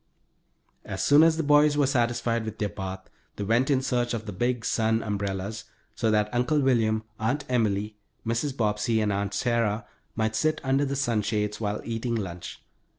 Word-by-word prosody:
As - - -4
soon 145 +1 +6
as 160 0 +5
the 165 - 0
boys 145 0 +4
were 145 - +4
satisfied 120 -3 0
with 110 -1 -6
their 105 - -1
bath 95 -1 -6 0.3
they 105 - -4
went 115 +6 +2
in 135 -2 +2
search 120 -2 0
of 110 -1 -5
the 105 - -6
big 120 +3 -1
sun 110 0 +1
umbrellas, 100 +1 -3 0.3
so 110 0 0
that 105 0 +1
Uncle 125 +5 +2
William, 115 -5 +2 0.2
Aunt 130 +6 -1
Emily, 105 -3 0 0.3
Mrs. 120 +5 -1
Bobbsey, 110 +1 +1
and 105 -2 +1
Aunt 100 0 -2
Sarah 115 -2 0 0.3
might 110 0 0
sit 155 +7 +1
under 135 +2 +2
the 140 0 -2
sunshades, 105 -4 -1
while 105 -1 -2
eating 115 +1 -2
lunch. 90 -5 -6
115 Hz, 175 wpm, -26 LUFS, 105-125 Hz, 0.3 s, soon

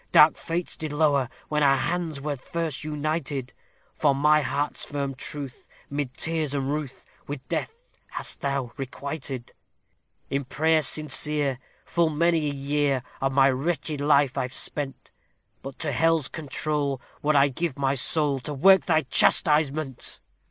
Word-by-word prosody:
dark 155 +1 +7
fates 170 +1 -3
did 155 -2 -4
lower, 145 -4 +2 0.2
when 150 0 0
our 135 -1 +5
hands 165 -1 -2
were 145 +1 -3
first 155 +2 -4
united, 150 -3 -3 0.4
For 145 -3 +2
my 150 +2 +4
heart's 145 +1 -2
firm 140 -2 -3
truth, 140 0 -7 0.2
'mid 140 -3 -3
tears 160 -3 -2
and 140 0 -1
ruth, 150 -4 -5 0.2
with 140 -2 -6
death 475 +2 -5
hast - - 0
thou 140 -3 -2
requited: 135 -1 -5 0.8
In 140 +1 0
prayer 160 +4 +2
sincere, 150 -2 0 0.3
full 170 -2 +2
many 160 0 +2
a - - -3
year 140 -1 0 0.2
of 135 0 +1
my 135 0 +5
wretched 145 +1 -2
life 145 -2 +3
I've 130 0 -3
spent; 140 -2 -4 0.5
But 135 -1 -8
to 155 - -2
hell's 165 0 +2
control 145 -2 -2 0.2
would 150 +1 +2
I 140 0 +5
give 150 +1 -3
my 135 -1 +1
soul 140 +2 +1
to 145 +4 -5
work 190 +7 +6
thy 160 -3 +4
chastisement!" 150 -1 +2
145 Hz, 145 wpm, -26 LUFS, 135-155 Hz, 0.8 s, dark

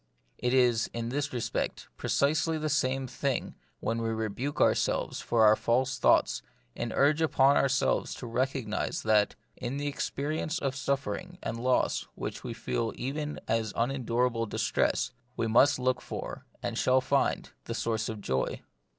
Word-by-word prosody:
It 125 - 0
is, 125 -3 +3
in 115 0 -2
this 145 +2 -1
respect, 120 -2 -2
precisely 155 +3 +1
the 155 0 -2
same 135 -2 +1
thing 130 +1 -2 0.3
when 115 +1 -1
we 115 - -1
rebuke 110 +5 -2
ourselves - - +2
for 115 -2 +3
our 105 0 +7
false 130 +4 +1
thoughts, - - +4 0.3
and 115 - -3
urge 145 +5 +3
upon 140 -3 +4
ourselves 135 -1 +2
to - - -7
recog 130 +2 -1
nise 105 0 -2
that, 105 -2 +3 0.2
in 125 +3 -3
the 145 - -3
experience 150 +2 -2
of 135 -6 -2
suffering 140 +7 -2
and 115 - -3
loss 130 +1 +1
which - - -5
we - - -4
feel - - -2
even 150 +3 -3
as 110 -2 0
unendurable 120 -1 0
dis - - -2
tress, - - +1 0.3
we - - +1
must 130 +6 +5
look 130 -1 0
for, - - -6 0.2
and 120 -1 -2
shall 130 +1 +4
find, 140 +1 +1
the - - -4
source 110 -1 -1
of 110 -2 -5
joy. 65 -7 -1
130 Hz, 160 wpm, -29 LUFS, 115-140 Hz, 0.3 s, our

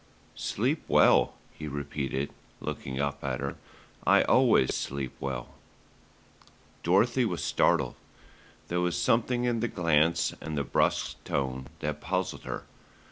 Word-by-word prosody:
"Sleep - - -1
well," - - +5 0.2
he 75 - -7
repeated, 70 -1 -3 0.3
looking 65 0 -4
up 70 0 -2
at 65 -2 -2
her, 70 0 -4 0.5
"I - - +5
always 65 - +4
sleep 70 -2 -3
well." 65 -3 -4 1.3
Dorothy 110 +9 +3
was 90 -7 -1
startled. - - +2 0.7
There 90 +1 0
was 90 -1 0
something 120 +6 +2
in 120 -2 +1
the 120 - 0
glance 85 -4 +2
and 75 -1 -4
the 70 - +1
brusque - - 0
tone 65 -1 -2
that 75 0 -3
puzzled - - -2
her. - - -4
75 Hz, 130 wpm, -29 LUFS, 70-90 Hz, 1.3 s, well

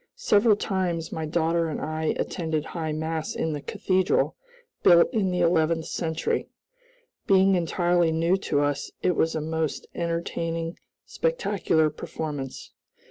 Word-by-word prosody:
Several 220 - +4
times 180 -5 -2
my 160 -1 -3
daughter 165 +1 +1
and 155 - -3
I 155 0 -2
attended 160 -3 -2
High 160 -3 -4
Mass 160 +1 -3
in 160 - -1
the 145 - -4
cathedral, 185 +4 +1 0.5
built 175 +6 +6
in 205 -5 +1
the 180 -1 0
eleventh 165 -1 +2
century. 160 -2 -2 0.8
Being 195 -2 +5
entirely 175 -1 +2
new 165 +3 +2
to 145 -6 0
us 145 -1 -1
it 180 - +2
was 160 +1 +1
a 155 - -1
most 160 0 -2
entertaining 165 0 -3 0.3
spectacular 205 - +1
performance. 145 -3 -6
165 Hz, 135 wpm, -26 LUFS, 160-180 Hz, 0.8 s, built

